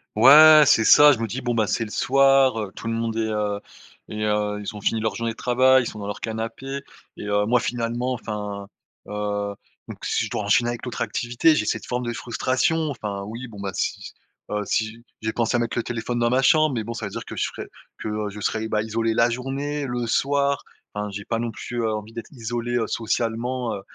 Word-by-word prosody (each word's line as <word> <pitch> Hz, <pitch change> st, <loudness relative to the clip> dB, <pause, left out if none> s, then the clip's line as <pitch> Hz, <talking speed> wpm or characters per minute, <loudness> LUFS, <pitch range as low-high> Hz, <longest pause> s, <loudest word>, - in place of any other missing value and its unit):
Ouais, 155 Hz, +6 st, +9 dB
c'est 110 Hz, -4 st, +4 dB
ça, 150 Hz, +5 st, +8 dB
je 130 Hz, -, 0 dB
me 115 Hz, -, -1 dB
dis: 125 Hz, +6 st, -5 dB
«Bon, 120 Hz, -1 st, -1 dB
bah, 110 Hz, -2 st, +1 dB
c'est 115 Hz, -, 0 dB
le 110 Hz, -, -7 dB
soir, 135 Hz, -1 st, +4 dB
heu, 105 Hz, -3 st, -3 dB
tout 115 Hz, -, -8 dB
le 115 Hz, -, -1 dB
monde 115 Hz, 0 st, -2 dB
est, -, -, 0 dB
heu, 105 Hz, -1 st, -1 dB, 0.5 s
est 105 Hz, -, -6 dB
heu, 105 Hz, -1 st, 0 dB
ils 105 Hz, +2 st, -5 dB
ont 105 Hz, -, -8 dB
fini 110 Hz, +2 st, 0 dB
leur 110 Hz, 0 st, -1 dB
journée 115 Hz, -1 st, -3 dB
de -, -, -20 dB
travail, 130 Hz, +1 st, +4 dB
ils -, -, -4 dB
sont 105 Hz, -, -7 dB
dans 100 Hz, -, -5 dB
leur 105 Hz, -, -5 dB
canapé» 115 Hz, +5 st, -5 dB, 0.3 s
et -, -, -7 dB
heu, 105 Hz, 0 st, +1 dB
moi, 120 Hz, +3 st, +3 dB
finalement, 120 Hz, +1 st, -2 dB
enfin, 105 Hz, -4 st, -5 dB, 0.4 s
heu, 105 Hz, -1 st, -2 dB, 0.4 s
donc -, -, -8 dB
si -, -, 0 dB
je -, -, -4 dB
dois 105 Hz, -, -2 dB
enchaîner 120 Hz, +4 st, +3 dB
avec 120 Hz, +1 st, -5 dB
l'autre 125 Hz, -, -5 dB
activité, 120 Hz, +7 st, +2 dB
j'ai -, -, 0 dB
cette -, -, -2 dB
forme 125 Hz, 0 st, -3 dB
de 120 Hz, -, -2 dB
frustration, 130 Hz, +7 st, 0 dB
enfin, 105 Hz, -5 st, -5 dB
oui, 115 Hz, +4 st, -7 dB
bon, 105 Hz, -, -11 dB
bah, 100 Hz, -1 st, -3 dB
si -, -, -2 dB
si -, -, -9 dB, 0.4 s
heu, 105 Hz, 0 st, -1 dB
si 110 Hz, +2 st, -2 dB, 0.2 s
j'ai 110 Hz, 0 st, -2 dB
pensé 120 Hz, 0 st, +1 dB
à -, -, 0 dB
mettre 120 Hz, 0 st, -2 dB
le 120 Hz, -, 0 dB
téléphone 120 Hz, +1 st, -3 dB
dans 120 Hz, 0 st, +2 dB
ma 130 Hz, +2 st, +2 dB
chambre 155 Hz, 0 st, +4 dB
mais 110 Hz, -, -2 dB
bon, 115 Hz, -, -4 dB
ça 115 Hz, -2 st, -4 dB
veut 100 Hz, -, -9 dB
dire -, -, -6 dB
que -, -, -8 dB
je -, -, -1 dB
serais -, -, -5 dB, 0.3 s
que 105 Hz, -1 st, -3 dB
je 105 Hz, -, -9 dB
serais, 110 Hz, +2 st, -1 dB
heu, -, -, -5 dB
bah, 105 Hz, -1 st, +1 dB
isolé 115 Hz, +1 st, -1 dB
la 115 Hz, +1 st, +3 dB
journée, 140 Hz, +4 st, -3 dB
le 120 Hz, -2 st, -3 dB
soir. 140 Hz, +3 st, +1 dB, 0.3 s
Enfin, 105 Hz, 0 st, -3 dB
j'ai 105 Hz, 0 st, -7 dB
pas 115 Hz, -, -1 dB
non 120 Hz, 0 st, -2 dB
plus, 120 Hz, +2 st, -5 dB
heu, 110 Hz, -, +1 dB
envie 105 Hz, +1 st, -6 dB
d'être 115 Hz, +5 st, -8 dB
isolé, 120 Hz, -1 st, -3 dB
heu, 115 Hz, -2 st, 0 dB
socialement, 115 Hz, +2 st, -2 dB
heu, 100 Hz, -, -7 dB
115 Hz, 245 wpm, -23 LUFS, 105-125 Hz, 0.5 s, Ouais